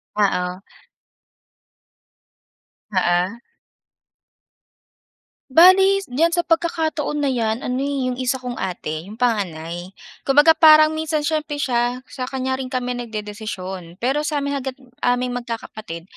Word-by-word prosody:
Oo. 180 Hz, -2 st, 0 dB, 2.3 s
Oo. 180 Hz, +4 st, +1 dB, 2.1 s
Bale 380 Hz, +6 st, +6 dB
diyan 330 Hz, +6 st, +2 dB
sa 345 Hz, -, +1 dB
pagkakataon 320 Hz, -3 st, 0 dB
na 275 Hz, -, +2 dB
'yan 225 Hz, -1 st, -1 dB
ano 250 Hz, +1 st, -2 dB
eh, 275 Hz, -2 st, -1 dB
yung 250 Hz, -, -6 dB
isa 255 Hz, +1 st, 0 dB
kong 250 Hz, -2 st, -6 dB
ate 170 Hz, -2 st, -4 dB
yung 215 Hz, -, -9 dB
panganay, 180 Hz, -6 st, -2 dB, 0.3 s
kumbaga 290 Hz, +4 st, +6 dB
parang 310 Hz, -1 st, +7 dB
minsan 315 Hz, -1 st, -2 dB
siyempre 300 Hz, -1 st, -1 dB
siya 245 Hz, -2 st, -1 dB
sa 255 Hz, -1 st, -6 dB
kanya 260 Hz, 0 st, -2 dB
rin 260 Hz, -, -4 dB
kami 250 Hz, -1 st, -2 dB
nagdedesisyon. 205 Hz, -6 st, -6 dB
Pero 270 Hz, +8 st, -1 dB
sa'min 280 Hz, -2 st, -1 dB
hangga't 265 Hz, 0 st, -5 dB, 0.2 s
aming 245 Hz, 0 st, +1 dB
magkakapatid 225 Hz, -7 st, -6 dB
255 Hz, 115 wpm, -21 LUFS, 210-295 Hz, 2.3 s, parang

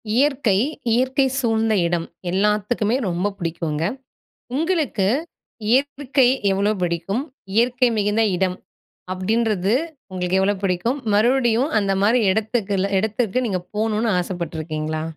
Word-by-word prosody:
இயற்கை, 265 Hz, -7 st, +2 dB, 0.4 s
இயற்கை 260 Hz, +3 st, +2 dB
சூழ்ந்த 225 Hz, -3 st, +1 dB
இடம் 170 Hz, -1 st, -1 dB, 0.3 s
எல்லாத்துக்குமே 210 Hz, +3 st, +1 dB
ரொம்ப 180 Hz, +4 st, -1 dB
புடிக்குங்க. 165 Hz, -3 st, -3 dB, 0.7 s
உங்களுக்கு 310 Hz, -, 0 dB, 0.6 s
இயற்றுகை 275 Hz, 0 st, +2 dB, 0.2 s
எவ்வளவு 200 Hz, +2 st, +1 dB
பிடிக்கும்? 175 Hz, +7 st, -1 dB, 0.3 s
"இயற்கை 245 Hz, +2 st, +3 dB
மிகுந்த 210 Hz, +2 st, +2 dB
இடம்." 185 Hz, 0 st, 0 dB, 0.6 s
அப்படின்றது 205 Hz, 0 st, 0 dB, 0.4 s
உங்களுக்கு 180 Hz, 0 st, -1 dB
எவ்வளோ 200 Hz, +2 st, +2 dB
புடிக்கும்? 195 Hz, +9 st, 0 dB
மறுவடியும் 240 Hz, +4 st, +3 dB
அந்தமாரி 200 Hz, +4 st, +2 dB
இடத்துக்குல 205 Hz, -2 st, 0 dB
இடத்துக்கு 220 Hz, +3 st, 0 dB
நீங்க 195 Hz, -5 st, -1 dB, 0.2 s
போகணுனு 220 Hz, +1 st, 0 dB
ஆசைப்பட்டுருக்கீங்களா? 155 Hz, -3 st, -3 dB
210 Hz, 100 wpm, -21 LUFS, 185-240 Hz, 0.7 s, இயற்கை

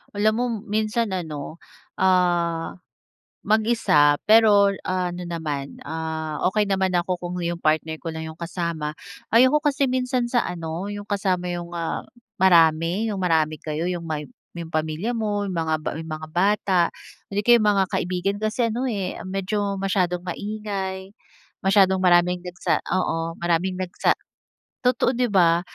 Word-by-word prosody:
Alam 215 Hz, +1 st, +3 dB
mo 245 Hz, -, +1 dB, 0.2 s
minsan 215 Hz, +1 st, 0 dB
ano, 160 Hz, -4 st, -5 dB, 0.4 s
ah, 175 Hz, -2 st, +1 dB, 0.7 s
mag-isa 215 Hz, -10 st, +3 dB
pero 210 Hz, -2 st, +6 dB, 0.2 s
ano 180 Hz, -1 st, -2 dB
naman, 150 Hz, -5 st, -4 dB
ah, 160 Hz, -1 st, -4 dB
okey 210 Hz, +2 st, +1 dB
naman 190 Hz, -2 st, +1 dB
ako 175 Hz, 0 st, -1 dB
kung 175 Hz, 0 st, -5 dB
'yung 170 Hz, 0 st, -2 dB
partner 160 Hz, +1 st, 0 dB
ko 165 Hz, -, -6 dB
lang 160 Hz, 0 st, -5 dB
'yung 160 Hz, +1 st, -9 dB
kasama. 165 Hz, -3 st, -3 dB, 0.3 s
Ayoko 255 Hz, +6 st, +5 dB
kasi 285 Hz, -1 st, +1 dB
minsan 255 Hz, -1 st, 0 dB
sa 240 Hz, -, +4 dB
ano, 170 Hz, +2 st, -5 dB
'yung 205 Hz, 0 st, -6 dB
kasama 195 Hz, -3 st, -1 dB
'yung, 175 Hz, 0 st, -5 dB
ah, 165 Hz, -1 st, -2 dB, 0.4 s
marami, 170 Hz, +2 st, +4 dB
'yung 195 Hz, -, -4 dB
marami 155 Hz, -4 st, +1 dB
kayo, 155 Hz, +1 st, -3 dB
'yung 175 Hz, -2 st, -2 dB
may 150 Hz, -1 st, -3 dB, 0.3 s
may 170 Hz, -, -4 dB
'yung 165 Hz, -, -13 dB
pamilya 155 Hz, +8 st, -1 dB
mo, 210 Hz, -3 st, -1 dB
'yung 190 Hz, -, -3 dB
mga 160 Hz, -2 st, 0 dB, 0.2 s
'yung 160 Hz, -, -8 dB
mga 155 Hz, 0 st, -6 dB
bata, 190 Hz, 0 st, +2 dB, 0.5 s
hindi 205 Hz, +1 st, -2 dB
kaya 240 Hz, -1 st, +6 dB
'yung 210 Hz, -, +3 dB
mga 190 Hz, -, +4 dB
kaibigan. 185 Hz, +3 st, -1 dB
Kasi 220 Hz, +1 st, 0 dB
ano 255 Hz, +3 st, -1 dB
eh 195 Hz, -5 st, -3 dB
medyo 200 Hz, +1 st, -2 dB
masyadong 185 Hz, -2 st, 0 dB
maingay, 195 Hz, -1 st, -4 dB, 0.5 s
masyadong 190 Hz, -1 st, +4 dB
maraming 180 Hz, 0 st, +4 dB
nagsa 180 Hz, -1 st, -1 dB, 0.2 s
oo, 165 Hz, -2 st, -1 dB
maraming 175 Hz, +2 st, 0 dB
nagsa 185 Hz, -1 st, 0 dB, 0.7 s
totoo 250 Hz, 0 st, +3 dB
'di 250 Hz, 0 st, +2 dB
ba. 170 Hz, -2 st, +4 dB
185 Hz, 150 wpm, -23 LUFS, 165-205 Hz, 0.7 s, pero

